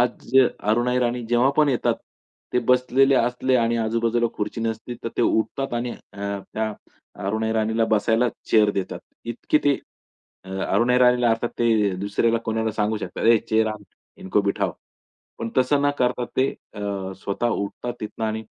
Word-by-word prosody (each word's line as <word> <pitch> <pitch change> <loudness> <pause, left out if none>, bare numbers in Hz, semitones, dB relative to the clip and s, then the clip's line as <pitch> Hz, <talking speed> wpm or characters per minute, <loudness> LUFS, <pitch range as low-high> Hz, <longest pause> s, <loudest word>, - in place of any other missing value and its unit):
आज 125 +1 0 0.2
अरुणा 120 +4 +1
ईराणी 125 -1 0
जेव्हा 120 +3 +4
पण 150 -1 +4
येतात. 130 -4 +1 0.6
ते - - +3
बसलेले 130 +2 +4
असले 125 +1 +1
आणि 115 -1 +1
आजूबाजूला 115 +1 +1
खुर्ची 105 +2 -3
नसते, 115 +2 -3
तर - - 0
ते - - +2
उठतात 120 +4 0
आणि 120 +1 -2
अ, 100 - -12 0.3
त्या 110 0 -1 0.5
अरुणा 110 +3 -1
ईराणीला 110 0 +1
बसायला 115 +3 +2 0.2
चेअर 105 -2 +5
देतात. 95 -2 -4 0.2
इतकी 120 +6 0
ते 145 -1 +4 0.7
अ, 95 - -11 0.2
अरुणा 120 +5 +3
ईराणीला, 125 -1 +4
अर्थात 115 +1 0
ते 110 -5 +2
दुसऱ्याला 115 +3 +1
कोणाला 110 0 -1
सांगू 105 +1 0
शकतात, - - -5
हे 115 0 +7
चेअर 110 +1 +1
आण. 105 -1 -10 0.4
इनको 95 +2 +1
बिठाओ. 100 0 0 0.7
पण 115 - -4
तसं 130 +2 +3
न 145 - +3
करता 125 0 +1
ते 130 +1 +3 0.3
अ, 100 -2 -4
स्वतः 100 +4 0
उठतात 105 +4 -3
तिथनं 110 +1 -4
आणि 110 0 -2
115 Hz, 160 wpm, -23 LUFS, 110-125 Hz, 0.7 s, हे